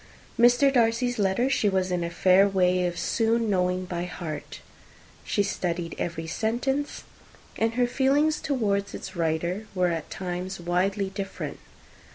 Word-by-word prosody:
Mr. 245 Hz, +4 st, +5 dB
Darcy's 240 Hz, 0 st, +2 dB
letter 200 Hz, +5 st, +2 dB
she 240 Hz, -6 st, +2 dB
was 190 Hz, -1 st, 0 dB
in 175 Hz, -1 st, 0 dB
a 170 Hz, -, -2 dB
fair 185 Hz, +3 st, +4 dB
way 180 Hz, -2 st, +2 dB
of 175 Hz, -1 st, -4 dB
soon 225 Hz, +4 st, +1 dB
knowing 180 Hz, -1 st, +1 dB
by 175 Hz, -1 st, -3 dB
heart. 165 Hz, -4 st, -6 dB, 0.6 s
She 205 Hz, -, +1 dB
studied 175 Hz, -4 st, -2 dB
every 165 Hz, -1 st, -3 dB
sentence; 240 Hz, -, -2 dB, 0.5 s
and 225 Hz, +1 st, 0 dB
her 250 Hz, 0 st, +3 dB
feelings 280 Hz, +5 st, +2 dB
towards 205 Hz, -8 st, -1 dB
its 190 Hz, -, -8 dB
writer 170 Hz, +5 st, -1 dB
were 180 Hz, -1 st, +2 dB
at 165 Hz, -2 st, -3 dB
times 185 Hz, 0 st, -4 dB
widely 190 Hz, +3 st, 0 dB
different. 195 Hz, 0 st, -5 dB
190 Hz, 145 wpm, -26 LUFS, 180-230 Hz, 0.6 s, Mr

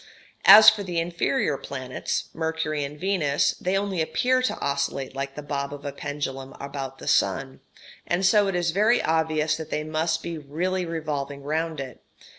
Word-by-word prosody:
As 215 Hz, -, +10 dB
for 215 Hz, -1 st, +8 dB
the 180 Hz, -3 st, -4 dB
inferior 165 Hz, -4 st, 0 dB
planets 130 Hz, -2 st, -4 dB
(Mercury 160 Hz, -2 st, -2 dB
and 145 Hz, +1 st, -7 dB
Venus) 170 Hz, -7 st, +1 dB
they 185 Hz, +2 st, +1 dB
only 195 Hz, -3 st, -1 dB
appear 255 Hz, +10 st, +1 dB
to 255 Hz, -, -1 dB
oscillate 140 Hz, -1 st, -2 dB
like 135 Hz, 0 st, -4 dB
the 150 Hz, -, -7 dB
bob 140 Hz, -1 st, -3 dB
of 145 Hz, 0 st, -9 dB
a 140 Hz, -, -3 dB
pendulum 135 Hz, -2 st, -5 dB
about 135 Hz, -1 st, -6 dB
the -, -, -10 dB
sun, 135 Hz, 0 st, +1 dB, 0.5 s
and 180 Hz, +2 st, +1 dB
so 205 Hz, +1 st, +4 dB
it 195 Hz, -, -1 dB
is 175 Hz, -1 st, +1 dB
very 215 Hz, +7 st, +3 dB
obvious 155 Hz, -1 st, +1 dB
that 160 Hz, -1 st, -7 dB
they 150 Hz, -, -2 dB
must 160 Hz, +1 st, -1 dB
be 170 Hz, -2 st, -5 dB
really 175 Hz, +5 st, -2 dB
revolving 145 Hz, -4 st, -4 dB
round 160 Hz, +1 st, -2 dB
it. 135 Hz, -2 st, -7 dB
155 Hz, 175 wpm, -25 LUFS, 140-175 Hz, 0.5 s, As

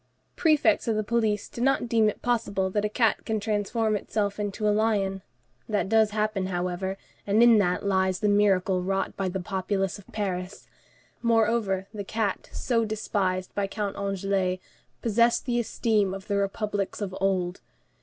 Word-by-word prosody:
Prefects 310 Hz, -5 st, +3 dB
of 225 Hz, -, +1 dB
the 215 Hz, -, 0 dB
police 215 Hz, -2 st, 0 dB
do 235 Hz, -, -8 dB
not 270 Hz, -1 st, +2 dB
deem 225 Hz, -2 st, +3 dB
it -, -, -7 dB
possible 200 Hz, -6 st, 0 dB
that 210 Hz, +1 st, 0 dB
a 210 Hz, -, 0 dB
cat 225 Hz, +1 st, +1 dB
can 220 Hz, -1 st, -1 dB
transform 215 Hz, +1 st, 0 dB
itself 205 Hz, 0 st, -2 dB
into 210 Hz, +1 st, -2 dB
a 210 Hz, -, +4 dB
lion; 205 Hz, -3 st, +1 dB, 0.5 s
that 210 Hz, -2 st, 0 dB
does 220 Hz, -1 st, +4 dB
happen, 210 Hz, -2 st, -1 dB
however, 180 Hz, +1 st, -2 dB, 0.3 s
and 210 Hz, +3 st, +4 dB
in 235 Hz, -2 st, +7 dB
that 180 Hz, 0 st, 0 dB
lies 190 Hz, -2 st, +1 dB
the 210 Hz, -, +1 dB
miracle 195 Hz, -3 st, +3 dB
wrought 195 Hz, +1 st, -1 dB
by 195 Hz, -1 st, -1 dB
the 190 Hz, +1 st, -3 dB
populace 190 Hz, +1 st, -2 dB
of 200 Hz, -, -16 dB
Paris. 190 Hz, -3 st, -4 dB, 0.5 s
Moreover, 225 Hz, -4 st, +2 dB
the 205 Hz, -2 st, -4 dB
cat 210 Hz, -1 st, -2 dB
so 230 Hz, -2 st, 0 dB
despised 200 Hz, -4 st, -2 dB
by 200 Hz, -1 st, -1 dB
Count 205 Hz, -1 st, -3 dB
Anglès 195 Hz, -2 st, -1 dB, 0.4 s
possessed 235 Hz, +1 st, +3 dB
the 240 Hz, -2 st, +1 dB
esteem 215 Hz, -4 st, +1 dB
of 195 Hz, 0 st, -9 dB
the 200 Hz, -1 st, -1 dB
republics 200 Hz, 0 st, -2 dB
of 195 Hz, -3 st, -4 dB
old. 185 Hz, -2 st, 0 dB
205 Hz, 165 wpm, -26 LUFS, 190-220 Hz, 0.5 s, in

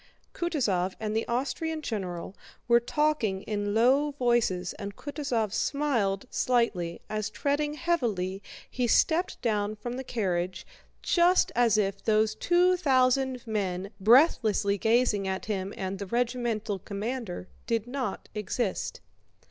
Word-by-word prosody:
Kutúzov 220 Hz, -, 0 dB
and 215 Hz, 0 st, -3 dB
the 225 Hz, -, 0 dB
Austrian 305 Hz, +6 st, -2 dB
general 185 Hz, -5 st, -4 dB, 0.3 s
were 235 Hz, 0 st, +6 dB
talking 240 Hz, -7 st, 0 dB
in 205 Hz, -1 st, -2 dB
low 270 Hz, +6 st, +3 dB
voices 235 Hz, -9 st, +1 dB
and 200 Hz, 0 st, -6 dB
Kutúzov 255 Hz, -8 st, -2 dB
smiled 235 Hz, -11 st, 0 dB
slightly 210 Hz, -9 st, 0 dB
as 215 Hz, -1 st, -2 dB
treading 290 Hz, +7 st, -1 dB
heavily 225 Hz, -, -1 dB, 0.3 s
he 250 Hz, -1 st, -1 dB
stepped 330 Hz, +9 st, +2 dB
down 210 Hz, -2 st, 0 dB
from 240 Hz, +4 st, -5 dB
the 265 Hz, -, -4 dB
carriage 185 Hz, -7 st, -2 dB, 0.4 s
just 355 Hz, +1 st, +4 dB
as 235 Hz, -3 st, +4 dB
if 200 Hz, -2 st, -1 dB
those 215 Hz, 0 st, +2 dB
two 355 Hz, +10 st, +3 dB
thousand 260 Hz, -4 st, +2 dB
men 195 Hz, -3 st, -2 dB
breathlessly 215 Hz, -, +4 dB
gazing 220 Hz, -3 st, +2 dB
at 190 Hz, 0 st, -3 dB
him 195 Hz, -2 st, -2 dB
and 190 Hz, 0 st, -4 dB
the 200 Hz, -, -5 dB
regimental 235 Hz, -3 st, -1 dB
commander 205 Hz, -1 st, -5 dB, 0.2 s
did 230 Hz, -2 st, 0 dB
not 255 Hz, +1 st, -4 dB
exist. 210 Hz, 0 st, -2 dB
225 Hz, 125 wpm, -28 LUFS, 200-260 Hz, 0.4 s, were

